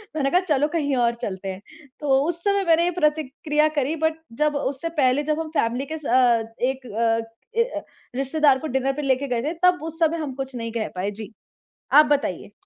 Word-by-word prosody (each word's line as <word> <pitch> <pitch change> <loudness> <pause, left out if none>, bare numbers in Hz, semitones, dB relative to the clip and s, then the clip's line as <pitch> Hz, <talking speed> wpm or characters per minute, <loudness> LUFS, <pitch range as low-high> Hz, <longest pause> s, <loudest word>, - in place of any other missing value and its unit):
मैंने 275 -3 +1
कहा 360 - +5
चलो 295 -6 +1
कहीं 285 -4 +1
और 235 -1 +2
चलते 190 -1 -4
हैं। 190 +1 -6 0.4
तो 295 - -4 0.2
उस 340 0 -3
समय 400 -1 +2
मैंने 330 0 +5
ये 355 - +1
प्रतिक्रिया 300 0 +1
करी 285 +4 0
बट 320 0 +1 0.3
जब 300 -1 +1
उससे 285 +3 -2
पहले, 285 -3 +2
जब 305 +1 -1
हम 320 -1 -4
फ़ैमिली 240 +4 0
के 315 +3 -5
सा 275 -4 +2 0.2
अ, - - -3 0.2
एक 265 +1 -1
अ 225 +1 +1 0.4
अ, 465 +2 0 0.3
रिश्तेदार 275 +1 +3
को 315 - -4
डिनर 265 +1 +1
पे - - -1
लेके 275 0 +1
गए 245 -3 -1
थे 305 +4 -1
तब 360 -3 +4
उस 325 +1 -6
समय 330 0 +2
हम 300 -4 -4
कुछ 270 -1 -5
नहीं 230 -1 -4
कह 225 -2 -2
पाए। 185 +2 -1
जी, 215 +1 -8 0.6
आप 305 - +9
बताइए? 280 - -1
285 Hz, 215 wpm, -23 LUFS, 255-315 Hz, 0.6 s, आप